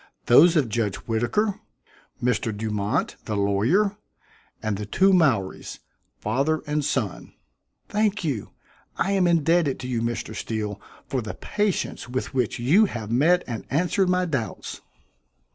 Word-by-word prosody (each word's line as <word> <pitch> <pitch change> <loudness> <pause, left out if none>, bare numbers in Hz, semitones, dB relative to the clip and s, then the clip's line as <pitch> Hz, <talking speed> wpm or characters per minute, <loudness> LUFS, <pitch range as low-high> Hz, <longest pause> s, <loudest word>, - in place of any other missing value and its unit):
Those 165 +8 +7
of 145 -6 +3
Judge 110 -3 -1
Whittaker, 120 - 0 0.6
Mr. 115 -2 +1
Dumont, 105 -1 -1
the 105 - -2
lawyer, 120 - +2 0.6
and 110 -2 -2
the 105 +1 -5
two 190 - +4
Mowries, 130 - +1 0.4
father 145 - 0
and 150 0 -1
son." 115 -9 -2 0.5
"Thank 210 -2 0
you. 135 -10 -2 0.5
I 195 - +1
am 190 -3 +3
indebted 165 -3 +2
to 125 - -5
you, 120 -3 -1
Mr. 115 -1 -3
Steele, 105 -1 -4 0.2
for 130 - -2
the 110 -1 -6
patience 205 -10 -2
with 130 +1 -3
which 125 -4 0
you 160 - +4
have 115 - -5
met 165 +9 +4
and 115 -3 -5
answered 180 +5 +1
my 180 0 +2
doubts." 140 -10 -4
130 Hz, 140 wpm, -24 LUFS, 110-175 Hz, 0.6 s, Those